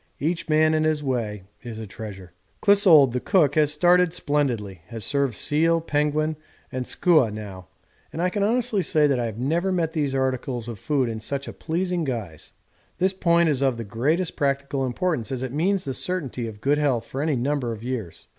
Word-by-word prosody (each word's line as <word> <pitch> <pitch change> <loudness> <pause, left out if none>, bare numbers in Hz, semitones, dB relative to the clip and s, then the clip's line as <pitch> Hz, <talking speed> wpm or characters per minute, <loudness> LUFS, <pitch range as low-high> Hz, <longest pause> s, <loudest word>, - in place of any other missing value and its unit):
Each 170 +3 -2
man 155 +1 +4
in 155 0 +2
his 155 -1 0
way 115 -7 -2 0.2
is 115 -2 -8
a 110 - -6
treasure. 95 -4 -9 0.3
Clissold 185 - +6
the 125 - -1
cook 165 -2 +2
has 150 -1 +3
started 175 +2 +3
splendidly, 120 - -1
has 115 -2 -5
served 140 -5 0
seal, 165 +6 +2
penguin, 150 0 0 0.3
and 130 -1 -4
skua 160 - +3
now, 100 -3 -8 0.4
and - - -7
I 180 +1 +1
can 205 - -2
honestly 225 0 +2
say 155 -4 +3
that 140 -3 +2
I 120 - -1
have 110 -2 -5
never 165 +10 0
met 170 -3 0
these 145 -4 -1
articles 130 -2 -2
of 115 -4 -7
food 140 -1 0
in 110 -1 -4
such 140 +5 -4
a - - -6
pleasing 175 +1 -2
guise; 110 - -5 0.5
'this 190 +1 +2
point 170 -2 +3
is 140 -4 +1
of 135 -3 +1
the 115 - -4
greatest 150 - -1
practical 140 -1 -1
importance, 140 -3 -2
as 130 -1 -3
it 130 -1 -4
means 185 +5 0
the 135 - -3
certainty 135 -9 -3
of 105 -2 -10
good 145 +4 +2
health 135 -6 +1
for 135 - -5
any 150 -1 +1
number 130 -1 -1
of 110 -1 -7
years.' 120 -9 -5
140 Hz, 200 wpm, -24 LUFS, 120-165 Hz, 0.5 s, Clissold